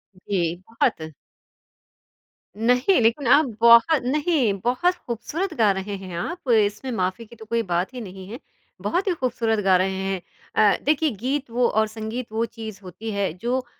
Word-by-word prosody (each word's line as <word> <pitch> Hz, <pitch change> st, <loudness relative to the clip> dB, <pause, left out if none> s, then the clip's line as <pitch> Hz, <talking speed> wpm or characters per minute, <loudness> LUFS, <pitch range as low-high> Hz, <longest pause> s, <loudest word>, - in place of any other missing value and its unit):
जी, 180 Hz, -3 st, -2 dB
बहुत। 160 Hz, -8 st, -1 dB, 1.5 s
नहीं 250 Hz, -, +3 dB
लेकिन 235 Hz, +4 st, +2 dB
आप 290 Hz, +5 st, +6 dB, 0.2 s
बहुत 235 Hz, +6 st, +6 dB
नहीं, 280 Hz, -, +1 dB
बहुत 255 Hz, +10 st, +2 dB
ख़ूबसूरत 310 Hz, -, -3 dB
गा 220 Hz, -7 st, +3 dB
रहे 200 Hz, +1 st, -4 dB
हैं 185 Hz, -2 st, -8 dB
आप, 305 Hz, -, -5 dB
इसमें 215 Hz, +3 st, +1 dB
माफ़ी 185 Hz, +5 st, -2 dB
की 230 Hz, -, -15 dB
तो 220 Hz, -1 st, -12 dB
कोई 230 Hz, +1 st, 0 dB
बात 175 Hz, +7 st, 0 dB
ही 250 Hz, -, -6 dB
नहीं 190 Hz, -3 st, -9 dB
है, 230 Hz, +5 st, -8 dB, 0.4 s
बहुत 365 Hz, +4 st, -1 dB
ही 375 Hz, -, +3 dB
ख़ूबसूरत 235 Hz, -7 st, -1 dB
गा 190 Hz, -1 st, +5 dB
रहे 190 Hz, 0 st, -1 dB
हैं। 190 Hz, -1 st, -2 dB, 0.3 s
अ, 205 Hz, -2 st, +4 dB
देखिए 305 Hz, +2 st, +2 dB
गीत 275 Hz, +1 st, -1 dB
वो 240 Hz, +1 st, +2 dB
और 220 Hz, 0 st, +2 dB
संगीत 225 Hz, +2 st, -5 dB
वो 225 Hz, +1 st, 0 dB
चीज़ 220 Hz, -3 st, -9 dB
होती 190 Hz, +5 st, -7 dB
है, 200 Hz, -3 st, -1 dB
जो 245 Hz, +8 st, -2 dB
230 Hz, 170 wpm, -23 LUFS, 200-255 Hz, 1.5 s, आप